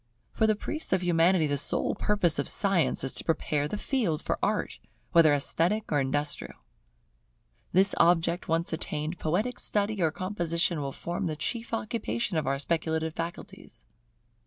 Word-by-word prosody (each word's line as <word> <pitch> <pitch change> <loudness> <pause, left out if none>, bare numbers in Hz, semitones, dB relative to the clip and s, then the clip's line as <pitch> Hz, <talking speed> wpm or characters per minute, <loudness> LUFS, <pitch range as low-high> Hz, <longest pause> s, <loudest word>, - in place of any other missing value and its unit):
For 220 - +2
the 215 - +3
priests 310 +6 -1
of 185 -1 +1
Humanity 175 0 +3
the 145 -1 -1
sole - - 0
purpose 185 -6 +2
of - - -2
Science 195 -9 +2
is 135 - -1
to - - -2
prepare 150 -3 0
the 210 - -4
field 210 - -1
for - - -2
Art, - - -1 0.3
whether 165 -3 +6
esthetic 170 +8 0
or 145 - +3
industrial. 145 +2 -2 1.2
This 190 +2 +4
object 170 0 +3
once 165 +1 0
attained, 155 +1 -4
poetic 205 +11 -1
study 205 -1 0
or 165 - +3
composition 170 -2 -1
will 140 -1 -3
form 175 +6 -4
the 155 - -2
chief 230 +9 -4
occupation 225 -2 -2
of 155 -4 0
our 135 0 +1
speculative 160 +2 -1
faculties. 165 - -8
170 Hz, 160 wpm, -28 LUFS, 155-200 Hz, 1.2 s, whether